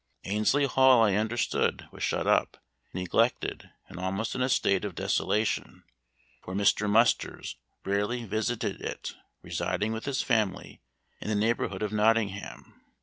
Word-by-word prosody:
Annesley 110 Hz, +8 st, +2 dB
Hall 130 Hz, -2 st, +5 dB
I 105 Hz, -3 st, +3 dB
understood 110 Hz, +3 st, 0 dB
was -, -, -12 dB
shut -, -, 0 dB
up, -, -, +2 dB, 0.3 s
neglected, 95 Hz, +7 st, 0 dB, 0.2 s
and 90 Hz, -2 st, -10 dB
almost 95 Hz, +4 st, -2 dB
in 130 Hz, -, -3 dB
a 130 Hz, -, +1 dB
state 100 Hz, -6 st, +2 dB
of -, -, -4 dB
desolation; 110 Hz, 0 st, -1 dB, 0.6 s
for 95 Hz, -, -7 dB
Mr. 100 Hz, +1 st, +2 dB
Musters 115 Hz, +3 st, +1 dB, 0.3 s
rarely 105 Hz, +5 st, -1 dB
visited 110 Hz, +3 st, -2 dB
it, -, -, -5 dB, 0.3 s
residing 110 Hz, +2 st, -2 dB
with 110 Hz, -, -5 dB
his 140 Hz, -2 st, -1 dB
family 110 Hz, -6 st, -1 dB, 0.4 s
in -, -, -7 dB
the 110 Hz, -, +1 dB
neighborhood 110 Hz, +1 st, 0 dB
of 105 Hz, -, -2 dB
Nottingham. 105 Hz, -2 st, 0 dB
110 Hz, 140 wpm, -28 LUFS, 100-115 Hz, 0.6 s, Hall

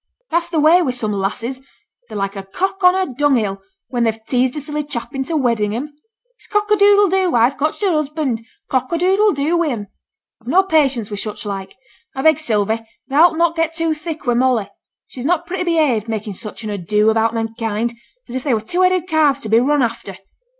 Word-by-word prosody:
'That's 340 Hz, +1 st, 0 dB
the 330 Hz, -3 st, 0 dB
way 320 Hz, +4 st, +6 dB
wi' 310 Hz, -, 0 dB
some 245 Hz, -4 st, -2 dB
lasses. 225 Hz, +6 st, -3 dB, 0.5 s
They're -, -, -6 dB
like 195 Hz, 0 st, -2 dB
a 195 Hz, -, -4 dB
cock 380 Hz, -, -3 dB
on 360 Hz, 0 st, +6 dB
a 375 Hz, -8 st, -1 dB
dunghill, 240 Hz, -8 st, +1 dB, 0.3 s
when 240 Hz, -1 st, 0 dB
they've 225 Hz, -1 st, -1 dB
teased 255 Hz, +2 st, +1 dB
a -, -, -3 dB
silly 300 Hz, +1 st, -3 dB
chap 280 Hz, -5 st, -5 dB
into 270 Hz, +4 st, -2 dB
wedding 225 Hz, -6 st, 0 dB
'em. 290 Hz, +5 st, -5 dB, 0.4 s
It's -, -, -16 dB
cock 420 Hz, 0 st, 0 dB
a -, -, +7 dB
doodle 405 Hz, 0 st, +5 dB
do, 375 Hz, -4 st, +1 dB
I've 240 Hz, +4 st, +3 dB
cotched 305 Hz, +7 st, -2 dB
a 390 Hz, -, +3 dB
husband, 300 Hz, -6 st, -1 dB, 0.2 s
cock 260 Hz, -1 st, -1 dB
a 335 Hz, -, +1 dB
doodle 385 Hz, +4 st, +3 dB
doo, 295 Hz, +2 st, 0 dB
wi' 340 Hz, -1 st, +1 dB
'em. 210 Hz, -6 st, -4 dB, 0.5 s
I've 225 Hz, -, -21 dB
no 360 Hz, +9 st, +4 dB
patience 275 Hz, -, +1 dB
wi' 205 Hz, -, -4 dB
such 215 Hz, +1 st, -5 dB
like; 195 Hz, -1 st, -5 dB, 0.4 s
I 265 Hz, -, -3 dB
beg, 315 Hz, -2 st, +5 dB
Sylvie, 220 Hz, -5 st, 0 dB, 0.3 s
thou'lt 320 Hz, +4 st, +4 dB
not 335 Hz, 0 st, +2 dB
get 325 Hz, 0 st, 0 dB
too 330 Hz, -1 st, 0 dB
thick 310 Hz, 0 st, -7 dB
wi' 245 Hz, -, +2 dB
Molly. 240 Hz, -4 st, +1 dB, 0.3 s
She's 250 Hz, -, -9 dB
not 340 Hz, +3 st, +1 dB
pretty 360 Hz, +1 st, -3 dB
behaved, 300 Hz, -, +1 dB
making 215 Hz, -2 st, -4 dB
such 215 Hz, +4 st, -7 dB
an 215 Hz, -, -4 dB
ado 210 Hz, +3 st, +1 dB
about 225 Hz, +1 st, +1 dB
men 225 Hz, 0 st, -2 dB
kind, 225 Hz, 0 st, -2 dB, 0.3 s
as -, -, -9 dB
if 260 Hz, 0 st, -3 dB
they 270 Hz, -6 st, +2 dB
were 215 Hz, -, -2 dB
two 345 Hz, +12 st, -2 dB
headed 365 Hz, -1 st, +2 dB
calves 305 Hz, -5 st, +2 dB
to 220 Hz, -, -6 dB
be 225 Hz, +2 st, +5 dB
run 285 Hz, +2 st, +2 dB
after.' 225 Hz, -5 st, -4 dB
265 Hz, 220 wpm, -19 LUFS, 225-330 Hz, 0.5 s, a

